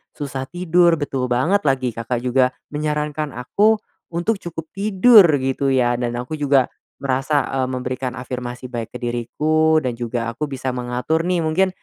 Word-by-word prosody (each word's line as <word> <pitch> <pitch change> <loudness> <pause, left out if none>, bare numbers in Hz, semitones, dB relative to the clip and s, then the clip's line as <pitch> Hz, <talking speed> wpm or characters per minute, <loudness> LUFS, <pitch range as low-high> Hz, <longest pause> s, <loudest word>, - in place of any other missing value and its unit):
susah 135 -2 -5
tidur, 175 -1 +3
betul 135 -4 -2
banget 145 +12 +2
lagi 130 -2 +1
Kakak 115 +2 -3
juga 125 0 +2 0.2
menyarankan 150 -1 -2
aku, 205 - +2 0.3
untuk 175 +5 -1
cukup 165 -2 -6
tidur 205 +1 +6
gitu 135 +1 0
ya. 125 -2 +2
Dan 120 -1 -2
aku 125 +5 -5
juga 140 -3 +3 0.3
merasa, 140 +2 +1
eee, 130 -1 -1
memberikan 130 0 -3
afirmasi 125 0 -6
baik 115 -1 -5
ke - - -2
diriku 155 +7 +1
dan 125 -2 -1
juga 115 -1 -3
aku 150 +6 -4
bisa 130 -1 -3
mengatur 125 +6 -1
nih 180 -2 +1
mungkin, 180 +5 +2
135 Hz, 155 wpm, -21 LUFS, 125-160 Hz, 0.3 s, tidur